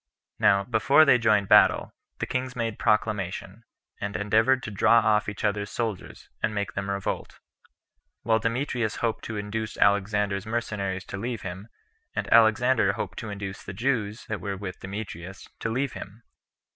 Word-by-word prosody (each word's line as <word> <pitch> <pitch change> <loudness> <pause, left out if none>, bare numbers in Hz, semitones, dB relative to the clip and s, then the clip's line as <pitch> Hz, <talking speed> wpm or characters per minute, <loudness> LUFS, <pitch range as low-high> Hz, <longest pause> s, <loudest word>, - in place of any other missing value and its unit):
Now, 100 0 +4
before 125 +8 +4
they 130 -4 +5
joined 105 -3 +3
battle, - - +5 0.2
the - - -2
kings 130 0 -3
made 115 -3 -3
proclamation, 105 0 -1 0.3
and 100 0 -4
endeavored 110 +6 +2
to 105 - -5
draw 105 +3 +4
off 105 -2 +3
each 105 - -7
other's 105 0 0
soldiers, 110 -5 -5
and 110 - -1
make 100 -3 -2
them 100 0 -3
revolt; 100 0 -3 0.9
while 110 -1 +3
Demetrius 115 -2 -1
hoped 115 -2 -2
to 110 - -4
induce 105 +2 -4
Alexander's 100 0 +1
mercenaries 100 -5 -3
to - - -6
leave 115 +2 -4
him, 95 +3 -7 0.5
and - - -2
Alexander 115 -1 +4
hoped 95 -2 -5
to 115 - -6
induce 100 -1 -6
the - - -7
Jews 110 -1 -1
that 110 -4 -4
were 100 -1 -3
with 95 -1 -7
Demetrius 95 -2 -7
to - - -2
leave 130 +1 -1
him. 105 +4 -10
105 Hz, 160 wpm, -26 LUFS, 100-115 Hz, 0.9 s, they